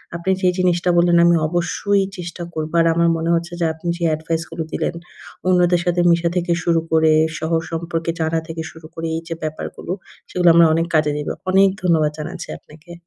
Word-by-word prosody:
আপনি 170 +3 -1
যে 185 - +4
জিনিসটা 180 -1 +1
বললেন, 170 0 +4
আমি 170 0 +5
অবশ্যই 180 +4 0
চেষ্টা 175 0 -6
করব। 155 0 -4
আর 165 - +4
আমার 170 0 +3
মনে 165 +1 -2
হচ্ছে 170 +1 -3
যে, 170 - +1
আপনি 160 +2 -9
যে 170 - -5
এডভাইস 160 +1 -3
গুলো 165 0 -4
দিলেন, - - -2 0.5
অন্যদের 180 -1 +3
সাথে 175 0 +1
মিশা 170 0 +2
থেকে 175 0 -1
শুরু 165 -1 +2
করে, 160 -1 +4 0.3
শহর 160 +1 0
সম্পর্কে 165 0 -2
জানা 160 0 0
থেকে 165 -1 -5
শুরু 160 -1 -13
করে, 165 0 -4
এই 165 - -3
যে 165 - -3
ব্যাপারগুলো, 155 +2 -5 0.4
সেগুলো 180 -1 +3
আমরা 170 0 +7
অনেক 165 +1 +1
কাজে 155 -1 +3
দেবো। 150 - -3 0.2
অনেক 195 +1 +5
ধন্যবাদ 160 -4 +2
জানাচ্ছি 155 - -6
আপনাকে। 155 +3 -15
170 Hz, 195 wpm, -20 LUFS, 160-175 Hz, 0.5 s, আমরা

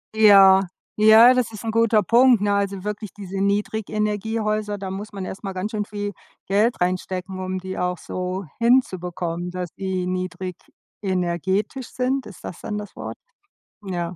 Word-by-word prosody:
Ja, 195 -3 +7 0.3
ja, 220 +3 +8
das 245 -3 0
ist 215 - -8
'n 225 - -2
guter 230 -2 +3
Punkt, 240 +2 +5
ne? 205 0 +2
Also 200 -2 -1
wirklich 210 -1 -5
diese 195 -1 -7
Niedrigenergiehäuser, 210 +1 -1
da 190 -1 -5
muss 205 +2 -6
man 195 -1 -5
erst 190 - -7
mal 195 - -3
ganz 190 +4 -3
schön 210 -2 -2
viel 205 -1 -4 0.4
Geld 210 +2 +2
reinstecken, 185 +1 -2
um 185 0 -3
die 190 0 -6
auch 180 0 -1
so 185 +3 -4 0.2
hinzubekommen, 180 -7 0
dass 180 -1 -4
die 190 -2 -3
niedrigenergetisch 185 - -3
sind. 255 +1 -1
Ist 200 -6 -12
das 170 - -7
dann 210 - -4
das 210 -1 -7
Wort? - - -6 0.7
Ja. 175 -2 -4
200 Hz, 155 wpm, -23 LUFS, 185-215 Hz, 0.7 s, ja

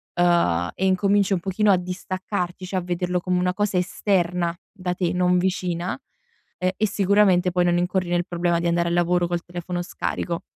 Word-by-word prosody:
uhm, 170 - +2
e 190 - -1
incominci 200 +1 +2
un 185 - +1
pochino 200 +3 +2
a 190 - +5
distaccarti, 185 0 -4
cioè, 185 +1 -2
a - - -9
vederlo 180 0 -1
come 180 0 0
una 180 0 +1
cosa 205 -1 0
esterna 180 -2 0 0.2
da 180 -3 -3
te, 175 -2 -1
non 180 0 +2
vicina, 180 -1 -1 0.7
uhm, 185 - +1
e 215 - +2
sicuramente 195 -2 +3
poi 175 0 +2
non 175 0 +2
incorri 180 0 -1
nel 175 0 +1
problema 175 -1 0
di 170 - -1
andare 170 0 +1
al - - -1
lavoro 175 0 +2
col 175 0 -2
telefono 175 0 -5
scarico. 175 -2 -3
180 Hz, 190 wpm, -23 LUFS, 175-185 Hz, 0.7 s, a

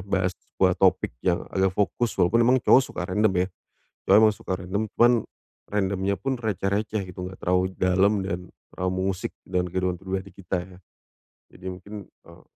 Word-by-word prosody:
bahas 95 -1 +1 0.2
sebuah - - +4
topik - - +3
yang 90 -1 +1
agak 95 0 +2
fokus. 110 +3 0
Walaupun 95 +6 +3
emang 130 +1 +5
cowok 130 - +7
suka 90 - -5
random, 105 +3 +2
ya, - - -5 0.6
cowok 100 - +8
emang 110 - +5
suka 105 -1 -8
random, 95 +3 -2
cuman 120 +1 +6 0.5
random 100 -2 -1 0.2
pun 130 +7 -3
receh-receh 105 -1 -1
gitu, 90 +1 -6
enggak 95 - -12
terlalu 90 +1 +1
dalam 95 +2 +2
dan 90 -2 -4 0.2
terlalu 90 0 -2
mengusik 95 -1 -3
dalam 90 -1 -1
kehidupan 90 -1 -2
pribadi 95 0 -4
kita, 90 -2 -4
ya. 90 0 -14 0.8
Jadi 95 - -12
mungkin, 95 +3 -8
eee, - - -19
95 Hz, 165 wpm, -25 LUFS, 90-105 Hz, 0.8 s, cowok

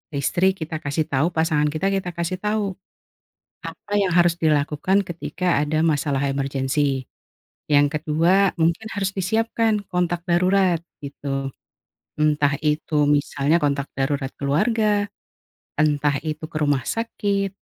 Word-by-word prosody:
istri 175 +7 +1
kita 160 -3 -5
kasih 145 +1 -1
tahu, 140 +3 +2
pasangan 160 -2 +2
kita, 155 +6 -1
kita 185 -3 -2
kasih 170 +2 -2
tahu 210 0 -1 0.9
apa 205 - -9
yang 190 -2 +1
harus 175 -1 +4
dilakukan 155 +6 +2
ketika 175 -1 -1
ada 155 +2 +1
masalah 145 -3 +1
emergensi. 135 0 0 0.6
Yang 145 0 +3
ke-2, 170 +6 +2
mungkin 170 +6 0
harus 195 -2 -1
disiapkan 220 +2 0
kontak 175 -1 0
darurat, 180 0 +3 0.2
gitu. 135 -1 -4 0.7
Entah 150 -2 +2
itu 150 -1 +1
misalnya 145 +2 +2
kontak 140 -1 0
darurat 135 0 -1
keluarga, 205 +8 +1 0.7
entah 145 -1 +2
itu 155 0 -5
ke - - -6
rumah 145 -3 +1
sakit, 200 -3 -1
160 Hz, 125 wpm, -22 LUFS, 145-190 Hz, 0.9 s, harus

